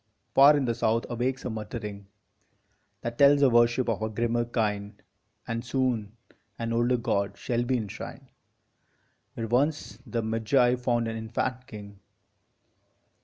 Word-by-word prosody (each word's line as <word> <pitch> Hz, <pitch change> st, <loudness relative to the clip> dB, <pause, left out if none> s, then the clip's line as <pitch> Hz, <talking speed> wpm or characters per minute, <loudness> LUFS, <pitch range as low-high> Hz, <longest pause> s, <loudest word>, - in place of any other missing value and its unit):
Far 145 Hz, +2 st, +7 dB
in 140 Hz, -, 0 dB
the 120 Hz, -, 0 dB
south 115 Hz, 0 st, 0 dB
awakes 125 Hz, +3 st, -2 dB
a 125 Hz, -, -2 dB
muttering 105 Hz, -2 st, -6 dB, 0.9 s
That 120 Hz, 0 st, -5 dB
tells 140 Hz, 0 st, +6 dB
a 135 Hz, -, +5 dB
worship 120 Hz, +2 st, +3 dB
of 115 Hz, -2 st, -1 dB
a 110 Hz, -, -1 dB
grimmer 120 Hz, +2 st, 0 dB
kind, 105 Hz, -3 st, -2 dB, 0.5 s
And 115 Hz, 0 st, -3 dB
soon 120 Hz, -4 st, -1 dB, 0.4 s
an 115 Hz, 0 st, -3 dB
older 120 Hz, +2 st, +2 dB
god 100 Hz, -4 st, -1 dB
shall 120 Hz, -1 st, -1 dB
be 125 Hz, +1 st, 0 dB
enshrined 105 Hz, -4 st, -7 dB, 1.0 s
Where 115 Hz, -, -3 dB
once 125 Hz, -2 st, 0 dB
the 115 Hz, -2 st, -2 dB
Magi 115 Hz, +3 st, +2 dB
found 120 Hz, -2 st, 0 dB
an 115 Hz, 0 st, -3 dB
infant 125 Hz, +3 st, -3 dB
King. 100 Hz, -2 st, -10 dB
115 Hz, 140 wpm, -27 LUFS, 110-125 Hz, 1.0 s, Far